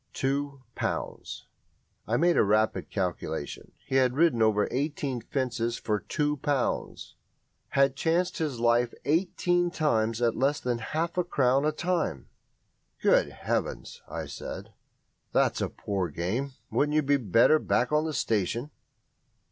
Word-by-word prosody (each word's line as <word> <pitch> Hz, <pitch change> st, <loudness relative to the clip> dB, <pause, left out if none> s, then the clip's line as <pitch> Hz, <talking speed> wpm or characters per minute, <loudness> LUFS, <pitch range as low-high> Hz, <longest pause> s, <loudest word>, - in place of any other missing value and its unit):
"Two 140 Hz, 0 st, -2 dB
pounds!" -, -, -4 dB, 0.6 s
I 115 Hz, -, +1 dB
made 170 Hz, +3 st, +3 dB
a -, -, +5 dB
rapid 110 Hz, +1 st, +1 dB
calculation. 85 Hz, -6 st, -4 dB
He 135 Hz, -, 0 dB
had 130 Hz, -1 st, +3 dB
ridden 155 Hz, -6 st, +3 dB
over 105 Hz, -1 st, +3 dB
eighteen 140 Hz, -2 st, -2 dB
fences 120 Hz, -2 st, -2 dB
for 105 Hz, -1 st, -1 dB
two 150 Hz, +8 st, -1 dB
pounds 140 Hz, -2 st, -2 dB, 0.5 s
had 135 Hz, -1 st, +2 dB
chanced 175 Hz, +5 st, 0 dB
his 150 Hz, -7 st, -2 dB
life 120 Hz, 0 st, +2 dB
eighteen 175 Hz, +2 st, +1 dB
times 115 Hz, -9 st, 0 dB
at 120 Hz, -2 st, +2 dB
less 140 Hz, +3 st, +1 dB
than 120 Hz, -1 st, -1 dB
half 165 Hz, +9 st, -2 dB
a -, -, +3 dB
crown 135 Hz, -4 st, +2 dB
a 155 Hz, -, +3 dB
time. 170 Hz, -, -2 dB, 0.7 s
"Good -, -, +3 dB
Heavens!" -, -, -3 dB
I -, -, -4 dB
said, -, -, -8 dB, 0.6 s
"that's -, -, +2 dB
a -, -, 0 dB
poor 95 Hz, -4 st, -3 dB
game. 105 Hz, -, -2 dB, 0.2 s
Wouldn't 150 Hz, +1 st, +1 dB
you 155 Hz, -, +3 dB
be 140 Hz, +1 st, +3 dB
better 120 Hz, -, +4 dB
back -, -, +1 dB
on 150 Hz, +1 st, +2 dB
the 160 Hz, -, -2 dB
station?" 115 Hz, +6 st, -1 dB
135 Hz, 140 wpm, -28 LUFS, 115-150 Hz, 0.7 s, a